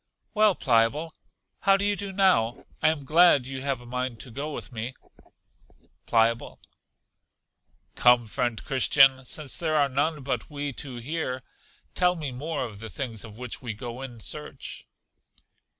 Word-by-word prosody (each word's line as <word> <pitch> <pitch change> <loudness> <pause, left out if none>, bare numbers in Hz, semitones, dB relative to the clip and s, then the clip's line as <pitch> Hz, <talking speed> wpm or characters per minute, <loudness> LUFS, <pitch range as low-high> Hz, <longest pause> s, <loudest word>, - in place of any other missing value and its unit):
Well, 215 -3 +4
Pliable, 130 +6 +2 0.5
how 195 0 +4
do 200 - -1
you 205 0 +2
do 200 -1 -5
now? 185 - +2 0.2
I - - +5
am 150 -3 -2
glad 155 -3 +5
you 130 0 -5
have 135 -2 -1
a - - -13
mind 125 -1 -3
to 125 - -8
go 145 +6 -4
with 145 - -7
me. 120 +2 -5 1.1
Pliable. 115 0 +2 1.3
Come, 125 -1 +5
friend 115 +1 -2
Christian, 135 -1 +4
since 145 0 -2
there 160 -2 0
are 145 -2 +4
none 145 +2 0
but 125 -3 -2
we 145 -2 -4
two 130 0 -5
here, 130 0 -3 0.5
tell 180 0 +3
me 150 -5 -4
more 145 +4 -3
of 105 -4 -9
the 110 +1 -6
things 115 -5 -4
of 110 -2 -11
which 125 +1 -6
we 115 -5 -5
go 120 +2 -7
in 125 -3 -8
search. 150 0 -5
135 Hz, 160 wpm, -27 LUFS, 120-155 Hz, 1.3 s, I